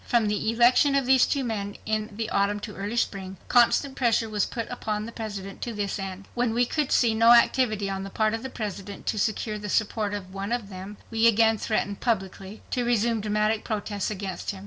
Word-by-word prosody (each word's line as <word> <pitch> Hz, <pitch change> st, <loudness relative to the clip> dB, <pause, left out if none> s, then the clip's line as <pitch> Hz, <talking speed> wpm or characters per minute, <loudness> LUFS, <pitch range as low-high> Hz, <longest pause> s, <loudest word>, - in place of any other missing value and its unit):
From 235 Hz, -3 st, +2 dB
the 210 Hz, +1 st, 0 dB
election 245 Hz, +4 st, +4 dB
of 275 Hz, -2 st, +2 dB
these 260 Hz, 0 st, +5 dB
two 280 Hz, -2 st, 0 dB
men 205 Hz, -4 st, -3 dB
in 215 Hz, 0 st, -1 dB
the 225 Hz, -1 st, -3 dB
autumn 200 Hz, +1 st, +1 dB
to 210 Hz, -1 st, -7 dB
early 205 Hz, +4 st, -4 dB
spring, 190 Hz, -4 st, -2 dB
constant 250 Hz, +3 st, +3 dB
pressure 230 Hz, -3 st, +2 dB
was 210 Hz, -2 st, 0 dB
put 230 Hz, -2 st, -4 dB
upon 215 Hz, -3 st, -3 dB
the 230 Hz, -, -7 dB
President 200 Hz, -4 st, -7 dB
to 235 Hz, -, -3 dB
this 205 Hz, -1 st, -3 dB
end. 195 Hz, 0 st, -6 dB
When 240 Hz, -2 st, 0 dB
we 245 Hz, +1 st, +3 dB
could 295 Hz, +2 st, -1 dB
see 235 Hz, -3 st, +4 dB
no 230 Hz, +2 st, +6 dB
activity 235 Hz, -4 st, +3 dB
on 195 Hz, 0 st, -3 dB
the 195 Hz, -, -6 dB
part 215 Hz, +2 st, +1 dB
of 225 Hz, -, -2 dB
the 265 Hz, -, -5 dB
President 205 Hz, -4 st, -6 dB
to 215 Hz, -, -1 dB
secure 215 Hz, 0 st, -1 dB
the 205 Hz, 0 st, -6 dB
support 210 Hz, -1 st, 0 dB
of 190 Hz, -2 st, -8 dB
one 195 Hz, +2 st, -4 dB
of 235 Hz, -4 st, -2 dB
them, 195 Hz, +2 st, -8 dB
we 225 Hz, 0 st, +4 dB
again 225 Hz, -1 st, +4 dB
threatened 205 Hz, -2 st, -1 dB
publicly 195 Hz, -2 st, -3 dB
to 250 Hz, -, 0 dB
resume 235 Hz, -1 st, +1 dB
dramatic 210 Hz, +1 st, 0 dB
protests 205 Hz, -2 st, -3 dB
against 195 Hz, -3 st, -5 dB
him. 195 Hz, -, -4 dB
215 Hz, 215 wpm, -26 LUFS, 200-235 Hz, -, no